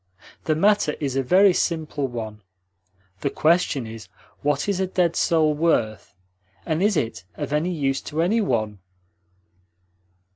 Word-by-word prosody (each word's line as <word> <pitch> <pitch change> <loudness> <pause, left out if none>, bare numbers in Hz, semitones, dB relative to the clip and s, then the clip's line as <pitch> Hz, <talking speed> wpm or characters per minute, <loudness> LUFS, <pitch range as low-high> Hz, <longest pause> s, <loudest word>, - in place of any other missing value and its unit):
The 155 - +2
matter 200 -3 +2
is 140 -3 -2
a 135 - +2
very 185 +8 +5
simple 155 -5 -1
one. 110 -3 -6 0.8
The 140 - -1
question 155 -4 +1
is: 110 0 -9 0.3
what 145 +2 0
is 200 -2 0
a 190 - 0
dead 175 -2 +1
soul 155 -2 +2
worth, 145 - 0 0.5
and 160 +2 -1
is 205 -2 +2
it 115 - -2
of 145 -1 -4
any 155 +4 +1
use 135 -5 -1
to 160 +2 0
any 220 +6 +2
one?" 110 - -1
155 Hz, 145 wpm, -23 LUFS, 135-175 Hz, 0.8 s, very